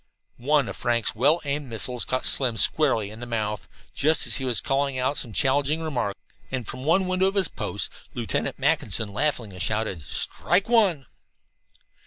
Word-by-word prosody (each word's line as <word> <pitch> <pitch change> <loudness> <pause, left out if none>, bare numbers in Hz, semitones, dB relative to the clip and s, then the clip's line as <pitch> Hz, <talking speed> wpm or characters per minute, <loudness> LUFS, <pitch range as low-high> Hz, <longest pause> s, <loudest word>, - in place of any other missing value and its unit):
One 140 +1 +2
of - - -5
Frank's 120 -2 0
well 145 +9 +3
aimed 140 -1 -2
missiles 120 +2 -3
caught 130 - -2
Slim 125 -4 +3
squarely 115 -10 +3
in 110 - -10
the 120 - -6
mouth, 105 -3 -3 0.3
just 155 +2 +2
as - - +4
he 135 - -3
was 125 -3 +2
calling 135 -1 0
out 130 +3 0
some 120 - 0
challenging 140 +5 +1
remark, 135 -11 -2 0.3
and 130 -5 -4
from 130 - -6
the 135 - -7
window 185 +2 +2
of 195 - -2
his 190 -6 +2
post - - -3 0.2
Lieutenant - - -2
Mackinson 105 -3 0
laughingly 120 -7 -1
shouted: 105 -3 -1
"Strike 175 - 0
one!" 200 - +3
130 Hz, 170 wpm, -25 LUFS, 115-150 Hz, 0.3 s, as